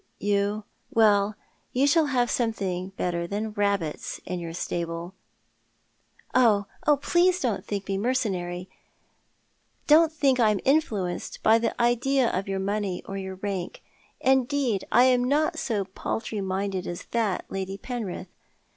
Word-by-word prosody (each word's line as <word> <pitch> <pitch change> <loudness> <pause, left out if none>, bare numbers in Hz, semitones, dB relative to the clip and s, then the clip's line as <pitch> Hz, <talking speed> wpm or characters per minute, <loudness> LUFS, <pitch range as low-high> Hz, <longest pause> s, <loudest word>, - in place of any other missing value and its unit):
You 205 +1 0
— - - -43
well, 210 -2 +3 0.4
you 260 +3 +3
shall 310 +2 +4
have 245 -3 +1
something 195 -6 -1
better 170 -1 -1
than 210 +3 -3
rabbits 200 -7 -1
in 180 0 -3
your 170 -1 -5
stable." 170 +1 -4 1.2
"Oh, 220 -5 +4 0.2
please, 290 -2 +4
please 360 +1 +3
don't 240 - -1
think 200 -1 -4
me 195 0 -1
mercenary; 190 -7 -1 1.2
don't 320 +1 +6
think 275 -5 +2
that 230 - +5
I - - +5
am 210 -2 +1
influenced 215 - 0
by 225 +1 +6
the 230 +1 -2
idea 240 +2 +2
of 190 +2 -2
your 195 0 -1
money 195 -1 -2
or 195 - -6
your 190 -1 -5
rank. 190 -2 -4 0.4
Indeed, 265 -4 +1
I 245 - +6
am 250 -1 +4
not 310 +5 +1
so 210 -5 -1
paltry 210 +2 -4
minded 190 0 -2
as 175 +1 -5
that, 220 -6 0
Lady 195 0 -4
Penrith. 210 -7 -5
205 Hz, 145 wpm, -26 LUFS, 190-250 Hz, 1.2 s, don't